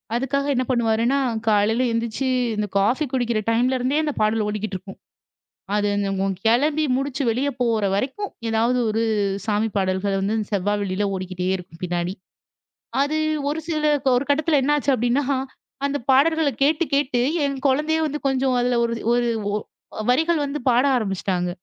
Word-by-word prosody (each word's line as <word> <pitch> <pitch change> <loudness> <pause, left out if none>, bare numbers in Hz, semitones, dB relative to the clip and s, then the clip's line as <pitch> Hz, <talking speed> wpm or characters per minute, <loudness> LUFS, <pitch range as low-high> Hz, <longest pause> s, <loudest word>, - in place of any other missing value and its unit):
அதுக்காக 270 +3 0
என்ன 255 - +1
பண்ணுவாருன்னா, 235 +2 +2 0.3
காலையில 220 +4 +3
எந்திச்சி 230 +3 -2 0.3
இந்த 210 0 -1
காஃபி 235 +10 +2
குடிக்கிற 240 -3 0
டைம்லேருந்தே 255 +4 +1
அந்த 300 -2 -1
பாடல் 215 0 +2
ஓடிக்கிட்டிருக்கும். 200 -2 -5 0.8
அது 205 0 +1
என்னமோ 195 -1 -1 0.2
கிளம்பி 290 +7 +3
முடிச்சு 275 0 -2
வெளியே 255 +5 0
போற 230 -3 +1
வரைக்கும் 280 - -2 0.2
எதாவது 230 +3 +1
ஒரு 220 +1 0 0.4
சாமி 215 +1 +1
பாடல்கள் 195 +1 0
வந்து 200 +3 0 0.2
செவ்வா, 205 +1 0
வெள்ளியில 200 0 -1
ஓடிக்கிட்டே 185 -1 -4
இருக்கும் 175 -2 -13
பின்னாடி. 175 +1 -2 0.9
அது 290 +2 0 0.3
ஒரு 305 - -2
சில 305 -2 0 0.3
ஒரு 250 +3 0
கட்டத்தில 300 +1 +3
என்ன 295 +2 +3
ஆச்சு 285 -1 +1
அப்டின்னா 245 +4 +1 0.6
அந்த 280 +1 0
பாடல்கள 315 +2 +4
கேட்டு 305 +4 +3
கேட்டு 275 -3 +1 0.2
என் 275 -1 -2
குழந்தையே 300 +4 +1
வந்து 300 0 -3
கொஞ்சம் 265 -1 +1
அதில 245 0 +1
ஒரு 235 0 0 0.2
ஒரு 240 0 +2 0.3
ஒ - - +1 0.6
வரிகள் 320 +3 +2
வந்து 285 +1 -4
பாட 245 +1 +4
ஆரம்பிச்சுட்டாங்க. 190 -4 -1
240 Hz, 145 wpm, -22 LUFS, 205-280 Hz, 0.9 s, பாடல்கள